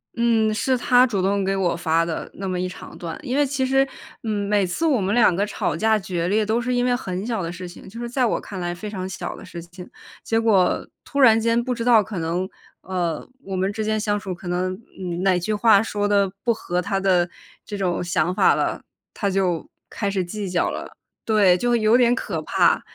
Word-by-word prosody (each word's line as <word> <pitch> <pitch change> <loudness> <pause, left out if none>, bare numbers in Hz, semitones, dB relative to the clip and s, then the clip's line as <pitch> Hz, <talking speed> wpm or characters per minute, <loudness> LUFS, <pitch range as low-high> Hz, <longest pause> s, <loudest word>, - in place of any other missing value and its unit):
嗯， 230 -2 +2
是 255 +4 +1
她 250 +1 +5
主 205 -6 -1
动 195 +1 +1
给 195 +1 0
我 185 -3 +1
发 165 0 +1
的 165 -2 -4
那 195 0 -5
么 185 -1 -2
一 185 - -1
长 185 - -11
段。 170 -2 -6
因 250 - -2
为 290 - +4
其 265 -1 -1
实， 270 +1 +3 0.4
嗯， 205 -2 -1
每 205 -2 +3
次 245 - -2
我 275 -8 +3
们 195 +2 0
2 220 -7 +5
个 200 - +1
吵 210 - -2
架 220 0 +2
决 175 -3 -2
裂， 210 +3 +2
都 220 +3 +1
是 250 +1 -1
因 245 - +1
为 245 - +2
很 185 -4 -4
小 230 -4 -2
的 165 - -3
事 180 0 -7
情， 175 - -12
就 230 +4 -9
是 240 - -4
在 250 +1 +1
我 230 - 0
看 195 - -7
来 175 -1 -2
非 195 +4 -7
常 190 -3 -4
小 190 - -5
的 - - -11
事 170 - -8
情。 175 +1 -11 0.4
结 225 - +1
果 210 -5 +2 0.2
突 280 - -4
然 230 -5 +7
间 230 +1 +2
不 250 0 -2
知 230 - -3
道 235 -3 +6
可 195 -1 -7
能， 170 +3 -1 0.3
呃， 175 -4 -3 0.2
我 195 -1 -5
们 190 +2 0
之 220 - -3
间 215 0 0
相 205 -1 0
处 190 -2 -5
可 175 +1 -10
能， 180 +1 -1 0.3
嗯 175 -1 -3
哪 185 -2 +3
句 215 +5 -2
话 215 -1 +5
说 205 -2 -1
的 200 -2 +2
不 240 - +3
合 180 -4 -2
她 195 +1 -1
的 180 -2 +2 0.4
这 205 - -5
种 180 -2 -1
想 175 0 0
法 - - +4
了， - - -1 0.3
她 200 - -1
就 185 -4 0 0.2
开 200 - -2
始 195 -2 0
计 195 +2 -5
较 180 - +1
了。 - - -7 0.3
对， 205 -5 +4
就 240 +4 +1
有 225 +1 +4
点 245 -1 +4
可 - - -3
怕。 - - +3
200 Hz, 250 characters per minute, -23 LUFS, 180-225 Hz, 0.4 s, 然